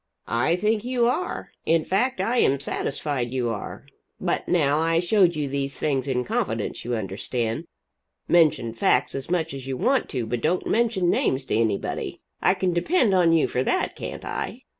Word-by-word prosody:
"I 120 +9 +1
think 210 +3 0
you 245 -1 +1
are. 250 +10 -2
In 165 -1 +2
fact 220 +4 0
I 230 +6 0
am 140 - +3
satisfied 140 -2 -2
you 125 -1 -1
are. 105 -3 -6 0.3
But - - -1
now 150 -3 +2
I 165 +1 +2
showed 180 -1 +3
you 150 -2 -1
these 140 0 -2
things 140 -3 -1
in 125 -2 0
confidence, 110 -2 -2
you 120 +1 -2
understand. 110 +3 -3 0.6
Mention 155 -9 +3
facts 125 +3 +2
as 135 +2 -5
much 165 -3 0
as 135 -1 -7
you 130 -1 -3
want 265 - +1
to, 125 -4 -2
but 115 +1 -3
don't 170 +7 0
mention 220 -6 +2
names 130 0 +1
to - - -1
anybody. 110 -3 -1 0.2
I 185 - +4
can 185 -1 0
depend 220 - +2
on 175 -3 +4
you 165 -2 +4
for 125 - -1
that, - - 0
can't - - -7
I?" - - -4
150 Hz, 180 wpm, -24 LUFS, 125-185 Hz, 0.6 s, I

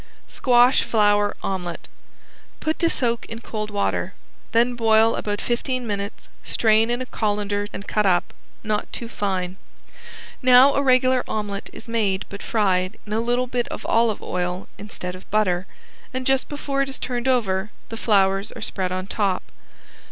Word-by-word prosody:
~SQUASH 245 0 +4
FLOWER 205 -2 +2
OMELET~ 180 -3 -4 0.7
Put 315 0 -2
to 335 - +3
soak 235 -5 +1
in 230 - -7
cold 215 -2 -5
water. 205 -1 -1 0.4
Then 235 +2 +3
boil 225 -1 +4
about 205 -1 -2
fifteen 250 +1 -2
minutes, 200 -2 -4 0.2
strain 220 0 +3
in 240 +1 -1
a - - -8
colander 205 -3 -1
and 200 - -8
cut 210 -2 +1
up, 180 0 +2 0.3
not 215 -1 -2
too 235 - -5
fine. 190 -4 -2 0.8
Now 255 +2 +7
a 280 - +2
regular 255 -1 +3
omelet 205 -2 -3
is 230 - -12
made 210 -5 0
but 200 - -8
fried 190 -3 +1
in 210 - -5
a 220 - +1
little 245 +2 +1
bit 245 -1 -2
of - - -7
olive 225 -2 +2
oil 180 +1 -3
instead 190 -3 -6
of 185 +1 -12
butter, 185 -4 +1 0.5
and 255 0 -2
just 270 0 +2
before 280 -1 -2
it 275 - 0
is 270 - -4
turned 245 0 -3
over 210 -6 +1 0.2
the 225 - -5
flowers 195 -3 +2
are - - -9
spread 185 -2 -2
on 185 0 -2
top. 195 -2 0
215 Hz, 165 wpm, -23 LUFS, 200-245 Hz, 0.8 s, Now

